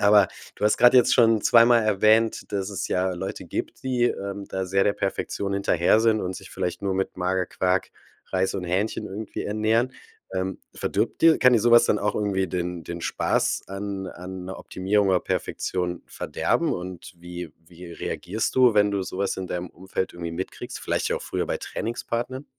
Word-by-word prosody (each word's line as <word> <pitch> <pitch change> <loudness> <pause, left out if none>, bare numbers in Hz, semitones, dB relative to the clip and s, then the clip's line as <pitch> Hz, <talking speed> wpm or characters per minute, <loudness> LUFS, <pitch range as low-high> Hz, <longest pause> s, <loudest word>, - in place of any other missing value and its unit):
aber 100 -1 +6 0.3
du - - -3
hast 105 - +3
grade 120 +1 +7
jetzt 125 0 +5
schon 115 -3 +4
zweimal 115 0 +6
erwähnt, 110 +2 +2
dass 100 0 -2
es 100 0 -3
ja 90 0 +1
Leute 95 +2 -5
gibt, - - -5
die, 125 -2 +1
ähm, 100 -3 -2
da 95 0 -3
sehr 95 +1 +2
der 100 - +3
Perfektion 100 0 -2
hinterher 100 0 +3
sind 110 -1 +3
und 90 0 -3
sich - - -11
vielleicht 90 - -3
nur 100 -1 0
mit 95 0 -2
Magerquark, 90 0 0 0.4
Reis 95 +1 +1
und 95 - -3
Hähnchen 95 +5 -1
irgendwie 105 +2 -5
ernähren. 110 +4 +1 0.4
Ähm, 95 +1 -2 0.2
verdirbt - - -1
dir 165 -1 +6
kann 125 - +6
dir 120 - +5
so 120 +3 +3
was 120 0 +8
dann 105 - +2
auch 105 - -1
irgendwie 100 -2 0
den 90 -1 -3
den 85 0 -6
Spaß - - 0
an 100 0 -5
an 90 +1 -8
'ne 95 - -6
Optimierung 100 +2 0
oder 95 -2 +3
Perfektion 90 -2 -2
verderben? - - -1
Und 90 0 -6
wie 90 -2 -8
wie 85 0 -11
reagierst 100 +5 -3
du, 125 -2 +6
wenn 105 0 +4
du 100 -1 -1
so 95 0 -6
was 100 -1 0
in 95 - -4
deinem 90 0 -4
Umfeld 95 +1 -4
irgendwie 85 -1 -5
mitkriegst, 90 +3 -6
vielleicht - - -1
ja - - 0
auch - - -6
früher - - -2
bei - - -2
Trainingspartnern? 120 +4 -4
95 Hz, 190 wpm, -25 LUFS, 90-110 Hz, 0.4 s, was